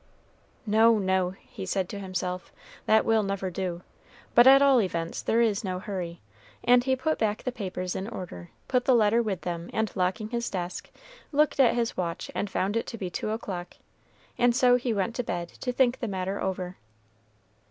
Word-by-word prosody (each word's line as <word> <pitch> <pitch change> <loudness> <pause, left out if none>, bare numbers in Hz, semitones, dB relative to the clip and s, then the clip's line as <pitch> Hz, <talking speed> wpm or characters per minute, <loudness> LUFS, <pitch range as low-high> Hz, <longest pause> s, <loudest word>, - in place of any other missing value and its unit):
"No, 220 +1 +5
no," 190 -2 +1 0.2
he 190 - -7
said 190 0 -1
to 205 - -6
himself, 185 -1 -4 0.4
"that 220 0 +4
will 225 -1 +3
never 195 -2 -2
do; 180 -1 -4 0.5
but 240 +2 +7
at 270 +1 +9
all 275 -3 +5
events 170 -4 -3
there 230 - +2
is 220 -1 +1
no 185 -2 -2
hurry," 180 -3 -5 0.4
and 245 0 +5
he 265 0 +2
put 315 +4 -1
back 215 -1 0
the 255 - -1
papers 185 -6 -4
in 190 - -3
order, 175 - -7 0.2
put 250 -1 +1
the 260 - +5
letter 225 +1 +4
with 200 -6 -2
them, 170 -1 -4
and 220 -1 -1
locking 195 +3 -1
his 235 0 -2
desk, 180 -2 -5 0.4
looked 295 -1 +2
at 250 -3 +5
his 235 -1 -1
watch 170 -1 -3
and 205 - -2
found 195 +2 -1
it 230 - -1
to 230 - -6
be 185 -4 -4
two 215 - -3
o'clock, 190 -5 -5 0.6
and 240 -1 +4
so 250 -1 +5
he 250 -1 -1
went 210 +1 -1
to 245 - 0
bed 175 -5 -3
to 250 - -4
think 250 -1 +2
the 235 - -2
matter 190 0 -3
over. 185 -1 -3
205 Hz, 195 wpm, -27 LUFS, 185-235 Hz, 0.6 s, at